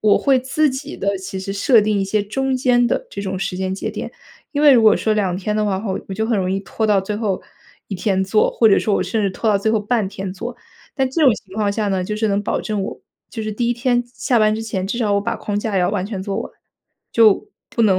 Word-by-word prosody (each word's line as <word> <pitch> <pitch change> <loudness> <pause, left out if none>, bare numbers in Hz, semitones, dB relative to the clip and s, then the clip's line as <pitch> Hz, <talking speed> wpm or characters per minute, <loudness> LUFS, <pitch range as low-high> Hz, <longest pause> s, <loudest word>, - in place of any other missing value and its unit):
我 210 -1 +4
会 270 -2 +3
自 285 +4 +1
己 280 +4 -5
的 200 0 0
其 190 0 -6
实 190 +1 -5
设 215 +4 +4
定 210 0 +1
一 195 - 0
些 205 +2 0
中 265 +6 -1
间 245 -1 +3
的 - - -1
这 200 - -5
种 190 -1 -3
时 190 0 -3
间 190 0 -2
节 - - -4
点。 - - -6 0.4
因 290 - -1
为 295 - +8
如 240 -3 +5
果 215 -1 +6
说 220 - 0
2 195 -4 0
天 210 +3 -2
的 215 - +1
话 195 -2 -1
后， 200 -3 -3
我 195 - -4
就 220 +3 -1
很 225 -2 +1
容 185 -1 -1
易 195 +1 -1
拖 220 +2 -2
到 205 -2 +3
最 205 +2 -4
后 210 -4 -2 0.5
一 200 - -4
天 190 +1 0
做， 200 +3 +2
或 225 - +4
者 195 - +5
说 210 - 0
我 - - +1
甚 190 +5 -1
至 195 - +1
拖 220 - -2
到 205 - +4
最 220 +2 0
后 220 - +2
半 215 -1 0
天 195 -1 -5
做。 235 +6 -6 0.4
但 265 -2 +1
这 315 +5 0
种 255 - +6
情 190 -3 -13
况 205 -1 0
下 210 0 -1
呢， 190 -2 0
就 210 - -3
是 220 0 0
能 200 0 +1
保 - - -1
证 210 -2 -2
我 190 - -6 0.3
就 225 - -5
是 215 - -3
第 235 +3 -1
1 - - +3
天 245 0 +1
下 240 - -28 0.2
下 - - +6
班 215 -1 +3
之 225 - -4
前， 195 -4 -3
至 210 - -3
少 215 -4 +1
我 200 - +2
把 205 - -2
框 205 -1 -3
架 210 -1 -2
要 180 - +2
完 195 -3 -1
全 200 -3 -5
做 195 0 -3
完， - - -5 0.6
就 225 - +4 0.2
不 230 - 0
能 195 -4 +4
210 Hz, 300 characters per minute, -20 LUFS, 195-230 Hz, 0.6 s, 为